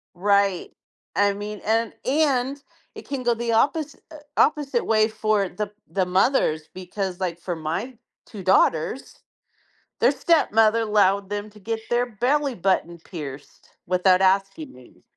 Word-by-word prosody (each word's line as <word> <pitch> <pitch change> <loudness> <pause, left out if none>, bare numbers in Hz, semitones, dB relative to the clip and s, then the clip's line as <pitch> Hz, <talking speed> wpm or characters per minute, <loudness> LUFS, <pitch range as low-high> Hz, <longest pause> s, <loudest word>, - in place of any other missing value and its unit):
Right. 200 0 +1 0.5
I 205 0 +3
mean, 205 +1 -7
and 225 0 +1
and 275 -1 +1 0.3
it - - -11
can 275 -3 -4
go 240 0 +2
the 235 0 -4
opposi 285 +6 +1
eh, 310 - -10 0.2
opposite 280 -5 +2
way 215 0 +3
for 215 -3 0
the 205 +2 -5 0.2
the 190 -2 0
mothers, 180 - +1
because, 185 0 -5
like, 180 -3 -2
for 175 0 -4
my 165 +11 -4 0.3
2 210 -4 -10
daughters, 185 +5 +1 0.8
their - - +5
stepmother 225 -9 +3
allowed 200 -2 +2
them 205 +1 -4
to 210 - -16
get 225 +2 -4
their 240 +1 +1
belly 260 +5 0
button 175 -3 0
pierced 150 -5 -10 0.2
without 185 +1 +3
asking 195 +10 +1
me. 125 -1 -18
210 Hz, 140 wpm, -23 LUFS, 185-240 Hz, 0.8 s, their